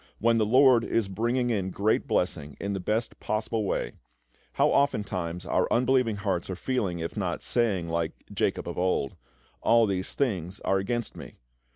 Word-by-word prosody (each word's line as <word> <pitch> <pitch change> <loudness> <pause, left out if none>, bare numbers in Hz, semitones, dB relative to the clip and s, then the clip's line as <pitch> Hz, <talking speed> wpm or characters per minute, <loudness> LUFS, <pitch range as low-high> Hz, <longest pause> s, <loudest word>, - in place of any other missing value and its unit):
When 115 +1 +3
the 110 - +2
LORD 130 0 +6
is 115 -3 0
bringing 120 +5 0
in 95 -4 -1
great 100 +4 0
blessing 70 -1 -1
in 100 0 -2
the 95 - -2
best 110 +5 -2
possible 110 0 -1
way, - - -1 0.6
how - - +3
oftentimes 90 -10 0
our - - +1
unbelieving 125 -2 +3
hearts 100 -4 -2
are 95 - -2
feeling, 100 -4 -1
if 85 0 -4
not - - -2
saying, 100 -8 +1
like 85 -1 -1 0.2
Jacob - - -1
of - - -4
old, 90 -7 0 0.5
"All 115 0 +5
these 95 -2 -3
things 95 - -1
are 95 - +1
against 120 +4 -3
me." - - -10
105 Hz, 170 wpm, -27 LUFS, 90-115 Hz, 0.6 s, LORD